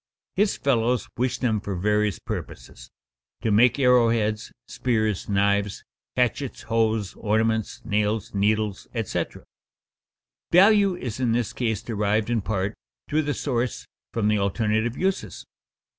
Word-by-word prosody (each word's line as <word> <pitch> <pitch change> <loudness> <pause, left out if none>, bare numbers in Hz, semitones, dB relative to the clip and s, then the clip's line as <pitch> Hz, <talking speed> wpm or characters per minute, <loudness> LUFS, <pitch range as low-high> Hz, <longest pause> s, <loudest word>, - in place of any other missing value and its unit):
His 205 +1 +2
fellows 125 -3 +1
wish 125 +1 0
them 110 -5 0
for 100 -1 -4
various 105 +2 +1
purposes: - - -7 0.5
to 110 - +1
make 115 +5 +5
arrow 125 -3 +5
heads, 110 -2 -1 0.2
spears, 110 -6 -1
knives, 100 0 +1 0.3
hatchets, 125 +2 -1
hoes, 110 -3 0
ornaments, 110 0 -1
nails, 105 0 0
needles, 105 0 0
etc. 115 -3 -3 1.1
Value 200 +1 +6
is 125 -8 -5
in 120 -3 +1
this 120 -2 -1
case 110 -5 -1
derived 105 0 0
in 115 -2 +1
part, 100 0 -2 0.3
through 155 +1 +1
the 145 -1 -2
source, 125 -3 -2 0.3
from 110 -3 0
the 105 -1 +2
alternate 110 +3 0
uses. 190 +3 -2
110 Hz, 130 wpm, -25 LUFS, 105-125 Hz, 1.1 s, Value